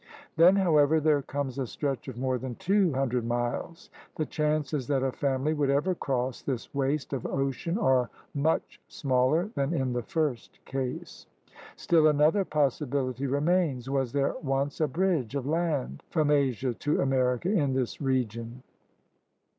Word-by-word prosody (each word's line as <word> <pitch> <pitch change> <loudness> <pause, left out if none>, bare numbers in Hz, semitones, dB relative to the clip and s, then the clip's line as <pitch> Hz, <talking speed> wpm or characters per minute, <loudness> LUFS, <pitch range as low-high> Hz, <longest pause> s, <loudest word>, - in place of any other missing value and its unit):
Then, 175 +4 +6
however, 160 -5 +4
there 150 -2 +3
comes 140 -1 -4
a 130 - -2
stretch 135 0 -3
of 130 -3 -7
more 130 0 -1
than 130 -1 -5
two 195 - +2
hundred 125 -2 0
miles. 120 +7 -3 0.2
The 155 - -1
chances 150 -3 -1
that 135 -2 +1
a 135 - +1
family 140 +3 0
would 145 -3 0
ever 145 +7 +2
cross 130 -6 -2
this 130 -4 -4
waste 140 +1 -1
of 130 - -2
ocean 140 +6 -2
are 130 - +2 0.2
much 150 +3 -1
smaller 140 +8 +1
than 140 +4 -1
in 130 -4 0
the 120 - -1
first 145 -1 -2
case. 130 -1 -5 0.5
Still 160 -2 +3
another 155 +6 +3
possibility 140 -4 -1
remains. 145 -2 0
Was 135 -3 0
there 140 -1 +1
once 140 0 -1
a 155 - +3
bridge 160 - 0
of 135 -2 -2
land 150 - -1
from 155 -3 +1
Asia 130 -3 +1
to 150 +6 -1
America 130 +4 +1
in 145 -10 +1
this 130 +1 -2
region.? 125 -2 -2
140 Hz, 155 wpm, -28 LUFS, 130-155 Hz, 0.5 s, Then